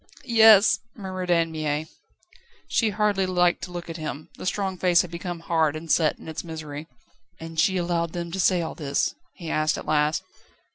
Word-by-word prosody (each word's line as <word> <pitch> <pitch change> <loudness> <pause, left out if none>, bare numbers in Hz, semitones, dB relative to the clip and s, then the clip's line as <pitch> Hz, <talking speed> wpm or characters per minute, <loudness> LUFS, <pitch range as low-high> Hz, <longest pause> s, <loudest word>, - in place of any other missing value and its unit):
"Yes," 220 -5 +6 0.2
murmured 185 -3 -5
Anne 165 -1 +2
Mie. 155 -1 -2 0.8
She 225 - +2
hardly 205 -2 +1
liked 180 -1 +2
to 180 - -12
look 175 -1 -6
at 165 0 -6
him; 155 0 -6
the - - -6
strong 195 -1 -1
face 180 -1 +4
had 180 - -9
become 170 0 -5
hard 160 -3 +1
and 160 0 -5
set 155 -3 +3
in - - -13
its 160 - -5
misery. 160 -2 -7 0.5
"And 165 0 -6
she 185 +3 +3
allowed 170 -2 -1
them 170 -1 -4
to 190 - -4
say 180 -1 +3
all 160 - -4
this?" 140 -3 -1 0.2
he 165 -3 -6
asked 155 0 +1
at - - -7
last. 150 0 +1
170 Hz, 190 wpm, -25 LUFS, 160-185 Hz, 0.8 s, Yes